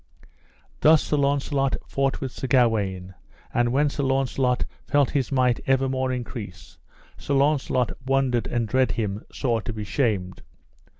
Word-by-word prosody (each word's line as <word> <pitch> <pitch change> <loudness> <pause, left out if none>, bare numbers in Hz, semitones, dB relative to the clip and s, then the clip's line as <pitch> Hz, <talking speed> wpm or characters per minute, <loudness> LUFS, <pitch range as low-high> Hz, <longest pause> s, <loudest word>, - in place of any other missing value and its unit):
Thus 155 0 +5
Sir 150 - 0
Launcelot 140 -1 +1
fought 135 0 -1
with 130 -2 -3
Sir 130 - -5
Gawaine, 105 -8 +1 0.4
and 120 0 +2
when 145 +4 +3
Sir 145 0 -3
Launcelot 135 -2 +1 0.2
felt 145 -2 +2
his 140 -1 -1
might 125 -3 +2
evermore 130 -1 +1
increase, 115 -6 -7 0.4
Sir 140 - -1
Launcelot 135 -3 +1
wondered 130 -2 +1
and 120 -2 -1
dread 130 +4 +2
him 105 -2 -3
sore 120 -4 -1
to 115 - -5
be 110 -1 -5
shamed. 100 -6 -1
130 Hz, 140 wpm, -24 LUFS, 115-135 Hz, 0.4 s, Thus